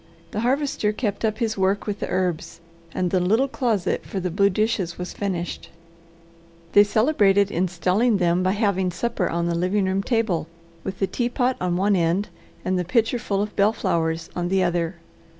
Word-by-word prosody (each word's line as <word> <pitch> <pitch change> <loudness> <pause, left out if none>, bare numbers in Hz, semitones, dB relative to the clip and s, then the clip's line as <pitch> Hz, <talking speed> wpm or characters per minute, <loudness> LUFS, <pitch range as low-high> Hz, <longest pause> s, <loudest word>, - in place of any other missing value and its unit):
The - - -3
Harvester 255 -2 +1
kept 210 -1 -3
up 215 -1 0
his 220 -4 -1
work 190 +2 +1
with 205 -1 -3
the - - -4
herbs, 180 -3 -2 0.3
and 180 0 -1
the 185 - +3
little 220 +9 +2
closet 225 -9 -1
for 195 - -4
the 180 -1 -2
blue 200 +3 +3
dishes 200 -4 -1
was 180 0 -5
finished. 180 -4 -4 1.0
They 205 - +7
celebrated 205 -3 +3
installing 185 +6 +1
them 175 -1 +2
by 185 +1 +2
having 200 -3 +1
supper 190 +2 -1
on 170 0 -1
the 170 - 0
living 185 +4 +1
room 190 +1 0
table, 205 - 0 0.4
with 190 -1 -5
the 195 - +1
teapot 245 +5 0
on 180 -1 0
one 200 +2 +2
end, 175 +3 +1 0.4
and 185 0 +1
the - - 0
pitcher 230 +5 +1
full 200 -4 -1
of 210 - -6
bellflowers 170 -6 0
on 175 0 -2
the 190 0 +2
other. 175 0 0
195 Hz, 180 wpm, -23 LUFS, 180-215 Hz, 1.0 s, They